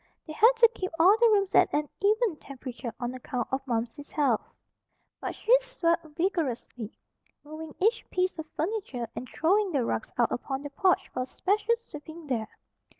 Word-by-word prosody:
They 310 - -7
had 455 +9 +6
to 465 0 +7
keep 370 - -3
all 365 +5 +7
the 470 -1 +6
rooms 400 -2 +2
at - - +5
an 295 0 0
even 425 -1 +2
temperature 250 -4 -7
on 245 0 -3
account 250 -1 -3
of 265 +1 0
Momsey's 240 +4 -3
health. 275 -8 +2 0.8
But - - -4
she 480 - +4
swept 440 -10 0
vigorously, 265 - -2 0.5
moving 310 +1 -9
each 450 +5 +2
piece 365 -2 0
of 320 - -5
furniture, 315 - -2
and 255 - -6
throwing 390 +4 +2
the 265 -5 +1
rugs 220 - -2
out 240 -2 +3
upon 270 +2 -3
the 290 - -6
porch 370 +5 +2
for 255 - -3
a 255 - -3
special 420 - +1
sweeping 315 -6 -11
there. 235 -6 -1
315 Hz, 175 wpm, -28 LUFS, 255-395 Hz, 0.8 s, to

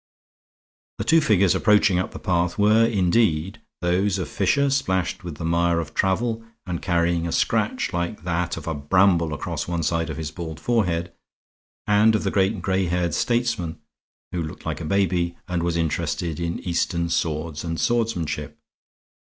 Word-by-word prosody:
The - - -2
two 165 0 +4
figures 100 - +3
approaching 105 -4 +4
up 95 - -2
the - - -9
path 90 -1 0
were 110 +2 +5
indeed 95 -1 +1 0.2
those 90 +3 +1
of 90 - -4
Fisher, 140 +8 +1
splashed 95 -13 0
with 85 -4 -6
the 80 - -6
mire 85 0 +2
of 80 -2 -5
travel 115 +4 0 0.2
and 90 -3 -4
carrying 85 -1 +1
a - - -3
scratch - - 0
like 85 +1 -3
that 85 -1 -1
of 80 - -7
a 80 - -2
bramble 85 +3 +3
across 75 - -4
one 85 -1 -2
side 85 +1 0
of 75 - -5
his 80 -1 -4
bald 80 -2 -7
forehead, 90 -8 0 0.7
and 105 +2 +4
of 110 - 0
the 100 - 0
great 95 +1 +2
and 95 -6 -7
gray 95 0 +1
haired 85 -1 0
statesman 115 -9 0 0.5
who 90 - -2
looked 75 -1 -7
like - - -3
a - - -4
baby 90 -1 0
and 90 -1 -1
was 85 0 0
interested 80 0 -2
in 85 0 -2
Eastern 85 -1 -1
swords 80 -1 -2
and 85 -1 -3
swordmanship. 90 -11 -1
90 Hz, 170 wpm, -23 LUFS, 85-100 Hz, 0.7 s, were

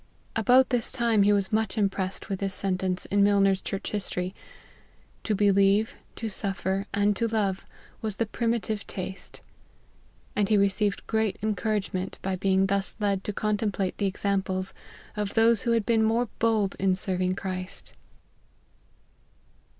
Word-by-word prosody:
About 250 +4 +5
this 245 -2 +1
time 235 -4 +2
he 200 +1 +5
was 200 +1 +1
much 220 -2 0
im 205 -2 +4
pressed 190 -1 -4
with 195 -3 -3
this 195 -1 -1
sentence 185 -1 -1
in 200 0 +4
Milner's 195 -1 +4
Church 195 - -4
His 205 -2 -2
tory; 180 +1 -3 0.9
"to 215 - 0
believe, 200 +1 +3 0.2
to 225 - -4
suffer, 195 -1 -2
and 205 +1 +2
to 230 +3 0
love, 205 -4 -1 0.3
was 215 -3 -3
the 230 - 0
primitive 225 -1 -2
taste 190 0 -7 0.5
;" - - -33
and 205 -1 +1
he 215 - +4
received 200 +1 +1
great 220 -2 0
encourage 215 -1 -1
ment 185 +1 -3
by 190 0 -1
being 190 +1 +2
thus 195 0 -1
led 200 -2 0
to - - -1
contemplate 205 -2 -1
the 200 - +2
examples 190 -1 -1 0.4
of 210 -1 -3
those 225 0 +4
who 235 - 0
had 225 -3 +1
been 230 -2 +3
more 225 +2 +2
bold 220 -4 +2
in 190 -1 +2
serving 185 -1 0
Christ. 185 -1 -5
200 Hz, 160 wpm, -27 LUFS, 190-220 Hz, 0.9 s, About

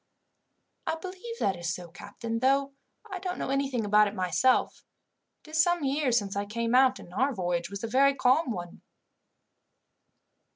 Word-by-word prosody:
"I - - 0
believe 375 +7 -8
that 195 - +1
is 175 -1 -3
so, 175 -1 -9
captain, 230 +6 -6
though 275 +2 +2 0.4
I 375 - -4
don't 365 0 -4
know - - -3
anything 270 -4 0
about 210 +1 +5
it 205 - -6
myself. 185 +8 +1 0.6
It 310 - -13
is 315 0 +4
some 350 -1 +1
years 270 -3 +1
since 200 -3 -2
I 200 0 -1
came 230 +2 -2
out, 260 0 +5
and 175 - -13
our 265 +6 +1
voyage 175 -2 -2
was 200 +1 -7
a - - -1
very 275 +4 +3
calm 260 +4 +3
one." 175 -6 -6
250 Hz, 170 wpm, -28 LUFS, 200-280 Hz, 0.6 s, about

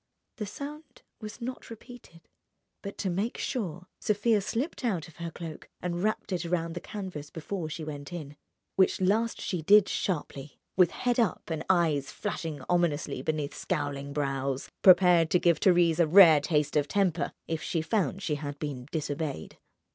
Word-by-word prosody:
The 210 -3 -4
sound 290 +8 -9 0.2
was 215 +1 -8
not 255 +2 -6
repeated, 230 -7 -13 0.5
but 200 -1 -7
to 195 - -1
make 200 +7 -2
sure 180 - -3
Sofia 215 0 +2
slipped 255 - -3
out 190 -10 -1
of 165 - -17
her 170 -1 -4
cloak 165 -1 -9
and 175 -1 -3
wrapped 215 0 -1
it 180 -2 -1
round 170 -1 -1
the - - -3
canvas 180 -8 -7
before 165 +1 -5
she 155 +1 -5
went 145 -1 -7
in; 150 -5 -7 0.4
which 190 - +4
last 215 +5 +1
she 180 -4 -2
did 205 +5 +6
sharply, 150 -5 -3 0.2
with 180 -3 +5
head 245 +4 -1
up 215 -6 0
and 160 -1 -2
eyes 160 -7 +2
flashing 165 -9 -4
ominously 175 -4 0
beneath 150 -2 -2
scowling 140 0 -3
brows—prepared 150 +5 +3
to 180 - +3
give 170 -2 +3
Thérèse 175 -3 +4
a 170 - +5
rare 165 -3 +8
taste 150 -1 0
of 145 -1 +2
temper 185 -2 +1 0.2
if 160 -1 -2
she 165 -3 -1
found 195 0 -1
she 160 - -1
had 145 -1 -5
been 140 -4 -5
disobeyed. 150 - -4
170 Hz, 165 wpm, -29 LUFS, 150-200 Hz, 0.5 s, rare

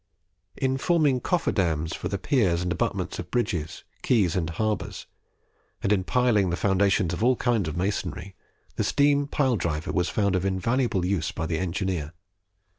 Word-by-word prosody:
In 130 0 0
forming 150 -5 +2
coffer 175 +5 0
dams 80 -4 0
for - - -4
the 100 - -2
piers 95 -7 +1
and 90 - -2
abutments 85 - -2
of - - -6
bridges, 90 -10 -2 0.2
quays, 100 -9 +2
and 85 -3 -1
harbours, 105 +6 -2 0.8
and 100 - +3
in 95 -2 +1
piling 115 -6 +2
the 85 - 0
foundations 95 -2 +2
of 90 - -2
all 125 +1 +4
kinds 115 -9 0
of 80 - -5
masonry, 95 -1 -3 0.4
the - - +1
steam 145 0 +2
pile 135 -5 +1
driver 80 -1 -2
was 90 -1 0
found 100 -3 +1
of 90 - 0
invaluable 95 +1 0
use 90 -4 0
by 80 - -4
the 80 0 -1
engineer. 90 -3 -2
95 Hz, 170 wpm, -26 LUFS, 85-120 Hz, 0.8 s, all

